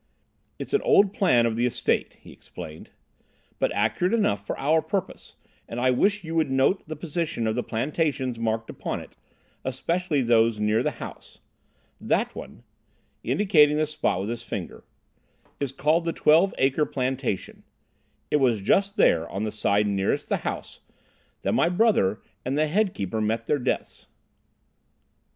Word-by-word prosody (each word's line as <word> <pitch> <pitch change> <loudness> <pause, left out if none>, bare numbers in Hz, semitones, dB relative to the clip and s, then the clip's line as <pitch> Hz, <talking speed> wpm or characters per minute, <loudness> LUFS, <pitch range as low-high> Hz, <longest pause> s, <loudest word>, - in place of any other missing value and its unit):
"It's - - -7
an 420 - +3
old 200 0 +4
plan 125 - +3
of 115 -1 0
the 120 +2 +1
estate," 125 - -1
he - - -14
explained, 80 0 -11 0.7
"but - - +1
accurate 115 - +1
enough 100 - +1
for - - -4
our 155 +3 +2
purpose, 195 +1 -4 0.3
and 120 - -4
I 130 +1 +3
wish 200 +11 +2
you 165 0 -6
would 160 -3 +1
note 135 +8 +2
the 155 - -5
position 155 -6 -3
of 110 - +1
the 125 - -1
plantations 130 0 -2
marked 115 0 -2
upon - - -4
it, - - -13 0.5
especially 150 +3 -1
those 115 -2 +3
near 105 +2 +2
the 150 - +1
house. - - -10 0.6
That - - 0
one," - - -10 0.6
indicating 150 - +4
the 155 - +2
spot 150 -11 -1
with 100 - -4
his 120 0 -4
finger, - - -6 0.8
"is 140 -3 -2
called 155 +5 +1
the 165 - -1
Twelve 165 +6 +4
Acre 135 +3 +2
Plantation. 130 -6 -3 0.7
It - - +4
was 125 -6 +2
just 200 - +2
there, 85 -1 +3
on 100 - -4
the 110 - -2
side 105 -1 +1
nearest 100 -1 -1
the - - +1
house, - - -6 0.6
that - - 0
my 170 - +3
brother 175 - +2 0.2
and 135 +3 -2
the 155 +1 +2
head 195 +4 +1
keeper 100 +3 -3
met 115 +2 -1
their 150 - +1
deaths." 125 0 -3
135 Hz, 160 wpm, -25 LUFS, 115-165 Hz, 0.8 s, old